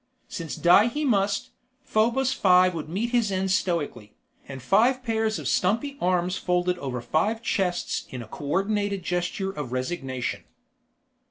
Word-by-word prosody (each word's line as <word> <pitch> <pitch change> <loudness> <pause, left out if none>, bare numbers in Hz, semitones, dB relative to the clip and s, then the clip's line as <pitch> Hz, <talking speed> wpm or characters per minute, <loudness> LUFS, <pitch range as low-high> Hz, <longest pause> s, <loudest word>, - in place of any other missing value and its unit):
Since 165 -2 -5
die 180 +6 +5
he 295 +5 -2
must, 210 +1 +1 0.3
Probos 245 +4 +1
Five 185 -5 +4
would 160 -2 -5
meet 215 +8 -2
his 235 -4 +2
end 190 0 0
stoically, 165 - -1 0.3
and 135 -1 -7
five 235 - +2
pairs 220 -3 0
of 150 -4 -5
stumpy 220 - +1
arms 180 +1 +1
folded 180 0 0
over 125 -3 -4
five 215 - 0
chests 180 -6 -1
in 125 -2 -6
a - - -13
coordinated 195 - -1
gesture 180 +3 -2
of 145 -9 -6
resignation. 130 -1 -3
185 Hz, 145 wpm, -25 LUFS, 165-220 Hz, 0.3 s, die